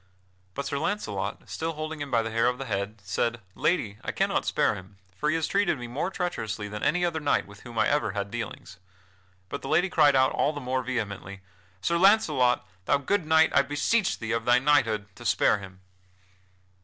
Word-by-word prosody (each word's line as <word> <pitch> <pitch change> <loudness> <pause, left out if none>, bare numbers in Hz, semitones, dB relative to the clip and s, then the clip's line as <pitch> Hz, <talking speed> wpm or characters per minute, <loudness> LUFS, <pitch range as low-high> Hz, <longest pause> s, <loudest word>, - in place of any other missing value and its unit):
But 140 - -3
Sir 140 0 -2
Launcelot, 140 - -3
still 165 0 -3
holding 155 0 -5
him 145 - -4
by 115 -3 +2
the 110 - -4
hair 115 +1 +2
of 125 0 0
the 135 - -5
head, 100 -1 -3
said: 115 -1 -1
"Lady, 110 - 0
I - - -2
cannot - - 0
spare - - +2
him, 95 +2 -11 0.2
for 150 - -1
he 155 - +2
has 165 - 0
treated 200 -6 +1
me 120 - -6
more 130 +9 -2
treacherously 115 - -3
than 105 +1 -6
any 175 +4 +2
other 165 -2 -1
knight 150 -2 +1
with 100 +1 -14
whom 120 -2 -10
I - - +3
ever 145 -9 +1
had 100 -1 -3
dealings." 115 -5 -6 0.7
But - - -5
the - - -7
lady 175 +4 +2
cried 145 -3 +5
out 130 0 +4
all 150 - +1
the 145 - -5
more 130 -1 -1
vehemently, 100 -6 -4 0.4
"Sir 170 - +1
Launcelot, 155 - +4 0.2
thou 145 - +3
good 160 +5 -1
knight, 160 0 +5
I 140 - +6
beseech 145 - +1
thee, 115 -1 -4
of 115 -1 -1
thy 120 0 +5
knighthood, 125 -7 +2
to 120 - -10
spare 110 -2 +3
him." 95 -1 -12
130 Hz, 205 wpm, -27 LUFS, 110-155 Hz, 0.7 s, I